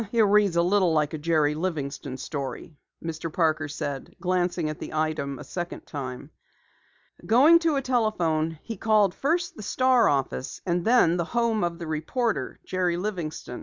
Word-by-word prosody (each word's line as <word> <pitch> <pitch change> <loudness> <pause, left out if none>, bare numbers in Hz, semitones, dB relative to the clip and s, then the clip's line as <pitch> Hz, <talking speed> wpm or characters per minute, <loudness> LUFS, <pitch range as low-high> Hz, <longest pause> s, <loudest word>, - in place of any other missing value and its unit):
"It 235 - +3
reads 205 -3 +4
a 170 - +4
little 185 -2 +3
like 150 -1 +1
a 155 - -3
Jerry 155 -2 +2
Livingston 150 -5 -4
story," 140 +3 -6 0.3
Mr. 165 0 -4
Parker 155 -2 +1
said, 145 -2 -5
glancing 180 -2 0
at 155 0 -5
the - - -7
item 155 -3 -1
a - - -8
second 175 -1 -6
time. 135 0 -6 0.9
Going 290 +9 +6
to 330 -3 +1
a 275 - 0
telephone 170 -11 0
he 225 -3 -6
called 210 -3 +3
first 345 - -1
the - - -9
Star 255 +3 +3
office 135 -2 -2
and 175 -1 0
then 220 -8 +4
the 170 - -1
home 230 -3 +2
of 170 -1 -1
the 170 - -6
reporter, 160 +10 -2
Jerry 180 -2 0
Livingston. 175 -10 -4
170 Hz, 165 wpm, -26 LUFS, 155-215 Hz, 0.9 s, Going